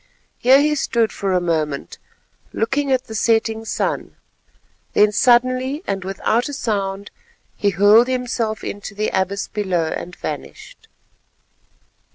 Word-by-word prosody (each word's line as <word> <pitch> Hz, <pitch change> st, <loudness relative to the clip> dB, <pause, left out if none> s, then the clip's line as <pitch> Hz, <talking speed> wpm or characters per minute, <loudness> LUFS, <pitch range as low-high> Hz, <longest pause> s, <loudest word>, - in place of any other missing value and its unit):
Here 260 Hz, +2 st, +6 dB
he 300 Hz, +1 st, +2 dB
stood 235 Hz, -6 st, 0 dB
for 195 Hz, -1 st, -3 dB
a 180 Hz, -, +3 dB
moment 155 Hz, -5 st, -2 dB, 0.5 s
looking 275 Hz, +5 st, 0 dB
at 260 Hz, -1 st, +2 dB
the 220 Hz, -, -9 dB
setting 225 Hz, 0 st, +1 dB
sun, -, -, -2 dB, 0.8 s
then 210 Hz, 0 st, +5 dB
suddenly, 255 Hz, -, +2 dB
and 195 Hz, -1 st, -3 dB
without 215 Hz, +6 st, -1 dB
a -, -, -6 dB
sound, 200 Hz, -5 st, -3 dB, 0.4 s
he 205 Hz, -, +1 dB
hurled 205 Hz, +6 st, +5 dB
himself 245 Hz, -4 st, -2 dB
into 200 Hz, 0 st, -6 dB
the 215 Hz, +1 st, -1 dB
abyss 190 Hz, +1 st, -1 dB
below 185 Hz, -5 st, -1 dB
and 180 Hz, -, -6 dB
vanished. -, -, -8 dB
220 Hz, 130 wpm, -20 LUFS, 195-255 Hz, 0.8 s, Here